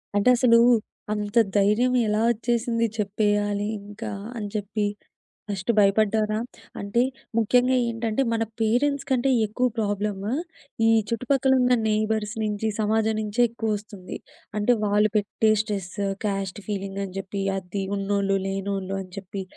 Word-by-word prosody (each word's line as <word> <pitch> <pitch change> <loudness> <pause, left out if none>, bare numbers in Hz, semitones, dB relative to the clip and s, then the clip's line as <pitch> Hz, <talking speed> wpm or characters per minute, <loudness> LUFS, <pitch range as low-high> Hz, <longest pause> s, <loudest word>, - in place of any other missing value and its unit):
అంటే 205 +4 +4
అసలూ, 230 -2 +5 0.5
అంత 210 +1 -3 0.2
ధైర్యం 210 +5 +3
ఎలా 210 +1 +1
ఒచ్చేసింది 230 0 0
చెప్పేయాలి 205 0 0 0.2
ఇంకా 205 +2 -7 0.3
అని 210 - -3
చెప్పి. 210 0 -1 0.6
ఫస్ట్ 200 +2 -1
భయపడ్డారా? 215 +1 +3 0.4
అంటే 200 +4 +1 0.4
ముఖ్యంగా 250 +3 +3
ఏంటంటే 230 +1 -1
మన 225 0 +1 0.2
పేరెంట్స్ 270 +6 +1
కంటే 260 0 +2 0.2
ఎక్కువ 240 +4 0
ప్రాబ్లము 205 0 -1 0.6
ఈ - - +5 0.2
చుట్టుపక్కల 265 +3 +1
ఉన్న 250 0 +4
నెయిబర్స్ 215 0 0
నుంచి, 210 +1 -1
సమాజం 220 +1 +1
నించే 215 +3 -1
ఎక్కువ 225 -2 -1
ఒస్తుంది. 200 -3 -9 0.4
అంటే 210 +4 +3
వాళ్ళు 210 +1 +3
పెట్టే 210 +1 +1
స్ట్రెస్, 200 -4 -4 0.3
కాస్ట్ 195 -1 -2
ఫీలింగ్ 195 -1 -4
అని 185 - -9
జెప్పి 195 +1 -4 0.2
అది 190 +1 -4
ఉన్నోళ్ళు, 195 0 +1
లేనోళ్ళు 195 0 -3
అని 185 -1 -11
చెప్పి. 195 0 -5
210 Hz, 130 wpm, -25 LUFS, 200-225 Hz, 0.6 s, అసలూ